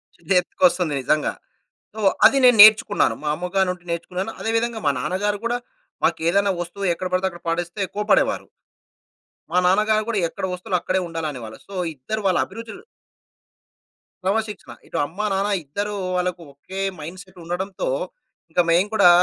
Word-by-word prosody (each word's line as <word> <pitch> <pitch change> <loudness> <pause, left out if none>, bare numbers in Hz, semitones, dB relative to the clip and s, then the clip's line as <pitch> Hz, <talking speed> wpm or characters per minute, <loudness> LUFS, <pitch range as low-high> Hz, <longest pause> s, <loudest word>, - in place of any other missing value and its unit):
చుర్రెత్తు‌కొస్తుంది 180 - +1
నిజంగా. 150 +4 +1 0.6
సో, 220 - -9 0.3
అది 270 +5 +7
నేను 245 -3 +6
నేర్చుకున్నాను. 215 -1 +6
మా - - -4
అమ్మగారినుండి 180 0 -1
నేర్చుకున్నాను. 180 +5 -3
అదే 225 - -2
విధంగా 235 -1 -1
మా 145 - +4
నాన్నగారు 205 +7 -1
కూడా, 240 +1 +1 0.5
మా‌కేదైనా 195 +5 +2
వస్తువు 195 +3 -5
ఎక్కడ 185 +2 -4
పడితే 185 +1 +2
అక్కడ 175 -1 -13
పడేస్తే 175 +4 -2
కోప్పడేవారు. 210 +1 +1 1.1
మా 180 - +3
నాన్నగారు 215 +3 +3
కూడా, 220 -3 0
ఎక్కడ 190 - -7
వస్తువులు 180 0 -1
అక్కడే 185 0 0
ఉండాలనేవాళ్ళు. 145 -9 -5
సో, 200 - -11 0.2
ఇద్దరు 215 +12 -4
వాళ్ళ 185 -2 +3
అభిరుచులు 225 -2 -9 1.4
క్రమశిక్షణ. 210 +1 -2 0.2
ఇటు - - -5
అమ్మా, 200 +8 -4
నాన్న 195 +2 0 0.2
ఇద్దరు 205 +8 -3 0.2
వాళ్ళకు 180 -1 -1
ఒకే 190 +7 -7 0.2
మైండ్‌సెట్ 185 +4 -10
ఉండడంతో, 190 - -3 0.6
ఇంకా 175 - +3
మేము 175 +4 +4
కూడా 200 -5 +6
190 Hz, 135 wpm, -22 LUFS, 175-210 Hz, 1.4 s, అది